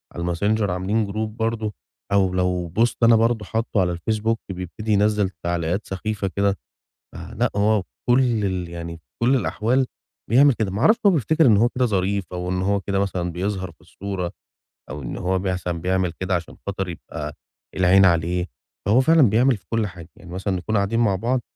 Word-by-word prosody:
على 85 - -4
الMessenger 100 +5 0
عاملين 95 +5 0
جروب 110 +2 -4
برضه 110 -1 -1 0.4
أو 95 -2 +3
لو 90 -1 0
بوست 115 +7 0
أنا 115 0 +7
برضه 115 -1 +2
حاطّه 110 -1 0
على 90 -1 0
الfacebook 110 +5 0
بيبتدي 95 +4 -5
ينزّل 105 -1 +2
تعليقات 85 +3 -1
سخيفة 100 +1 -3
كده. 100 0 +1 0.6
فلأ، - - -2
هو 105 0 +2 0.3
وكل 120 -4 +3
ال 90 -3 -2
يعني 85 -1 -6
في 80 - -26 0.2
كل 130 +3 +4
الأحوال 125 +1 +1 0.4
بيعمل 135 +4 +6
كده. 110 -4 -2
ما 100 +4 -3
أعرفش 220 - +5
هو 200 - +7
بيفتكر 160 - +2
إن 110 -5 +6
هو 115 +4 +4
كده 125 +1 0
ظريف 100 -2 0
أو 90 0 -3
إن 90 0 -1
هو 100 +2 +1
كده 100 +1 -1
مثلًا 90 -3 -1
بيظهر 95 +1 -3
في 80 - -26
الصورة 90 0 -5 0.6
أو 75 - -6
إن - - -5
هو 95 +1 0
مثلًا 90 -3 -2
بيعمل 95 -1 0
كده 95 0 0
عشان 85 -1 -5
خاطر 95 -2 -3
يبقى 75 -3 -6 0.4
العين 95 +1 +5
عليه 85 0 +2 0.4
فهو 110 +7 +4
فعلًا 160 +4 +5
بيعمل 120 +3 +3
في - - -26
كل 115 -2 0
حاجة. 90 -4 -11
يعني 85 - -13
مثلًا 95 +1 -2
نكون 95 +5 -2
قاعدين 100 +3 +1
مع 105 -5 +3
بعض 120 +6 0
100 Hz, 185 wpm, -23 LUFS, 90-110 Hz, 0.6 s, أنا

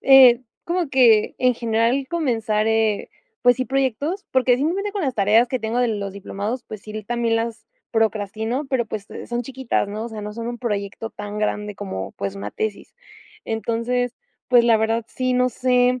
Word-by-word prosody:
eh, 260 -2 +8 0.2
como 345 -2 -1
que 235 -5 +5
en 250 -1 +3
general 235 +3 +1
comenzar, 225 -10 0
eh, 220 -2 +1 0.3
pues 245 0 +5
sí, 255 - -1
proyectos, 270 - -1
porque 255 -1 +3
simplemente 380 +9 -1
con 405 - -2
las 265 -4 -1
tareas 215 +4 +4
que 255 - -1
tengo 225 +1 -2
de 245 - +2
los 200 -3 -3
diplomados, 200 +5 -4
pues 215 -1 -9
sí, 215 0 -6
también 235 +1 0
las 230 0 -3 0.2
procrastino, 220 +4 -1
pero, 260 -3 0
pues, 210 -1 -6
eh, - - -7
son 240 0 -2
chiquitas, 260 -4 -1
¿no?, 215 +2 -4
o - - -4
sea, 220 -2 -7
no 210 0 -5
son 230 +1 -5
un 240 - -5
proyecto 210 -1 -3
tan 205 0 -6
grande 210 -1 -1
como, 190 - -5
pues, 100 0 -4
una 100 +1 -5
tesis. 215 - -4 0.5
Entonces, 235 +2 -1 0.3
pues, 245 -2 +6
la 230 -1 +5
verdad 225 +1 0
sí, 255 0 -1
no 250 0 +3
sé, 250 +1 +2
230 Hz, 190 wpm, -22 LUFS, 215-255 Hz, 0.5 s, eh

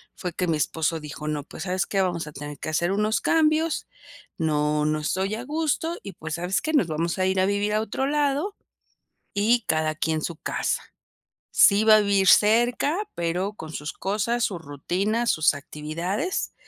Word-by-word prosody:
fue 180 -2 -5
que 180 - -1
mi 165 -2 +1
esposo 160 +2 0
dijo: 150 0 -6
"No, 150 -1 -2
pues, 160 - -8
¿sabes 185 0 -1
qué?, 195 - 0
vamos 175 -4 -1
a 150 - -9
tener 145 +1 -8
que - - -6
hacer 170 +3 0
unos 210 +2 +1
cambios. 315 0 +2 0.5
No 150 -2 +1
no 155 0 +1
estoy 190 +7 -1
a 235 +3 -6
gusto, 320 +3 -1
y 200 - -6
pues, 160 0 -7
¿sabes 180 +3 -1
qué?, 315 - -2
nos 285 - +3
vamos 165 +2 -2
a 185 - +2
ir 190 0 +1
a 185 - +4
vivir 205 +1 0
a 215 - +2
otro 220 +5 -2
lado, 290 +6 0 0.8
y 225 +4 +2
cada 155 0 +1
quien 160 0 -1
su 170 - -4
casa. - - -2 0.7
Sí 205 +1 +6
va 220 -1 +8
a - - +5
vivir 200 -2 +2
cerca 240 - +4 0.2
pero 175 +4 -1
con 160 -7 -9
sus 150 0 -4
cosas, 215 +5 -1
sus 175 -5 -3
rutinas, 190 - -1
sus 155 - +3
actividades". 165 - -3
190 Hz, 185 wpm, -25 LUFS, 155-220 Hz, 0.8 s, va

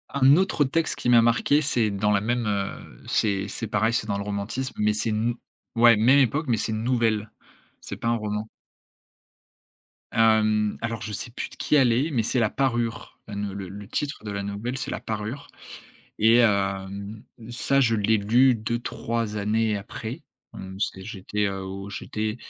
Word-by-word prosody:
Un 140 0 +5
autre 185 -4 +2
texte 160 +5 0
qui - - -2
m'a 120 -1 +7
marqué 120 +6 +3
c'est 120 -7 +1
dans 100 +1 0
la 100 -1 +2
même, 120 +2 -1
heu 100 -1 -4
c'est 100 -2 0
c'est 115 +3 -5
pareil 110 +2 +1
c'est 110 - -1
dans 100 -2 -1
le 100 - -3
romantisme, 105 +6 -3
mais 105 0 +2
c'est 110 - -1
une 110 +1 0
nou 120 - -4 0.4
ouais 115 0 +7
même 125 +7 +5
époque, 140 +4 +1
mais 120 -3 +2
c'est 110 - -2
une 110 +1 -3
nouvelle, 115 -4 +1 0.5
c'est - - -7
pas 115 - -2
un 120 - +2
roman. 105 0 -3 1.7
Hem, 110 -2 +3
alors 115 -2 -3
je 105 - -5
sais 115 - -5
plus - - -5
de - - -14
qui - - 0
elle 130 -5 +5
est, 140 +7 +1
mais 120 -6 +1
c'est 125 +3 0
La 110 -3 +2
Parure. 120 -4 -2
Heu, - - -7
ne 100 -1 -3
le 95 -2 -6
le 100 +1 -9
titre 145 -1 -3
de 105 - -4
la 100 0 -3
nouvelle, 105 +6 -4
c'est - - -4
La - - -3
Parure 110 +5 -5 0.7
et 110 +2 +6
hem, 100 -1 0 0.3
ça 135 +3 +1
je 115 -4 +3
l'ai 110 +1 +2
lu 120 +6 +4
2-3 115 0 -3
années 105 +1 +1
après. 100 - -7 0.3
Hem, 95 0 -8
c'est 95 -2 -2
j'étais, 105 0 -2
heu, 95 -1 -3
au 95 +1 -7
j'étais 105 +2 -3
110 Hz, 190 wpm, -25 LUFS, 105-120 Hz, 1.7 s, m'a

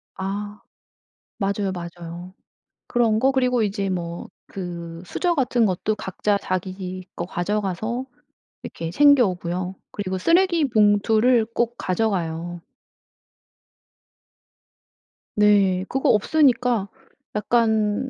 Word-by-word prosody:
아. 205 +2 -5 0.8
맞아요, 200 0 -1
맞아요. 175 0 -8 0.5
그런 230 -3 +2
거. 265 +3 +3
그리고 250 -3 +2
이제 200 -1 -1
뭐 170 -2 -4 0.2
그 170 -3 -7
수저 350 - 0
같은 250 -6 +2
것도 210 +2 0
각자 200 +1 -1
자기 185 -1 -4
거 170 - -3
가져가서 210 +6 -2 0.6
이렇게 165 0 -6
챙겨 285 +2 +6
오고요. 180 0 -3 0.2
그리고 190 -2 -3
쓰레기 335 - +3
봉투를 220 +2 +3
꼭 240 0 0
가져가요. 175 -4 -2 2.8
네. 200 -3 +3
그거 270 - +1
없으니까 245 -3 +3 0.5
약간 220 +2 +1
205 Hz, 210 characters per minute, -23 LUFS, 185-235 Hz, 2.8 s, 챙겨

